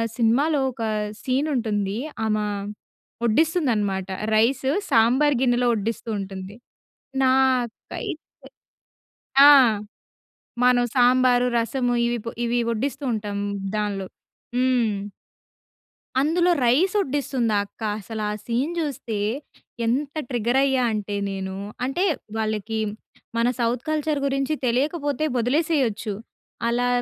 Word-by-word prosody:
సినిమాలో 275 +6 +2
ఒక 235 - -6 0.4
సీన్ 265 +4 0
ఉంటుంది. 210 -4 -1 0.3
ఆమ 215 -1 +1 0.9
వడ్డిస్తుంది 310 - +2
అన్నమాట. 195 -2 -1 0.3
రైస్ 255 +5 +2 0.2
సాంబార్ 255 +5 +4
గిన్నెలో 245 -1 +2
వడ్డిస్తూ 225 +2 -3
ఉంటుంది. 195 +2 -7 0.7
నాకైతే 260 +2 0 1.3
ఆ! - - +11 1.1
మనం 250 -1 +5
సాంబారు, 250 0 +4
రసము 245 +2 0
ఇవి 240 0 0 0.3
ఇవి 240 +1 +1
వడ్డిస్తూ 275 +5 -3
ఉంటాం 205 -2 -3 0.4
దానిలో. 205 -2 -2 0.5
హ్మ్. 240 -6 +1 1.2
అందులో 345 +4 +3
రైస్ 325 - +3
వడ్డిస్తుంది 265 - -1
ఆ - - +3
అక్క 215 - -26 0.2
అసల 220 +2 -6
ఆ - - -2
సీన్ 255 +8 -1
చూస్తే 260 -8 -3 0.7
ఎంత 275 +5 0 0.2
ట్రిగ్గర్ 240 +1 +1
అయ్యా 265 -2 +2
అంటే 205 -1 -3
నేను, 190 -1 -4 0.3
అంటే 270 +8 -1 0.3
వాళ్ళకి 220 0 -2 0.6
మన 235 - +3
సౌత్ 235 +1 0
కల్చర్ 305 -1 0
గురించి 275 +2 0
తెలియకపోతే 285 +4 0
వదిలేసేయొచ్చు. 250 -5 0 0.6
అలా 245 +1 +1
245 Hz, 100 wpm, -24 LUFS, 220-275 Hz, 1.3 s, ఆ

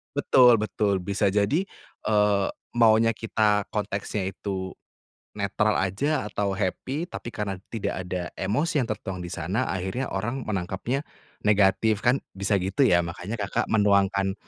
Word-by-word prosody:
Betul 125 -2 +6
betul. 105 -3 0
Bisa 100 +2 +1
jadi, 105 - +1 0.4
eee, 105 -2 +3 0.2
maunya 115 -1 +5
kita 105 -2 +1
konteksnya 100 -2 -3
itu 95 -2 -4 0.7
netral - - +1
aja 105 - 0
atau 100 -2 -2
happy, 130 - -2
tapi 120 - -7
karena 100 -4 -4
tidak 105 -4 -3
ada 90 -1 -4
emosi 140 - 0
yang 115 - -3
tertuang 95 -3 -4
di 85 - -6
sana, 90 +11 -2
akhirnya 95 +8 -2
orang 120 +7 -3
menangkapnya 105 - -3 0.4
negatif, 105 +1 +3
kan 125 +3 +3 0.2
bisa 100 +1 +1
gitu 95 +9 -1
ya. 85 -9 +4
Makanya 90 +6 -5
Kakak, 100 -2 -2
menuangkan 100 -2 +3
105 Hz, 135 wpm, -26 LUFS, 95-115 Hz, 0.7 s, Betul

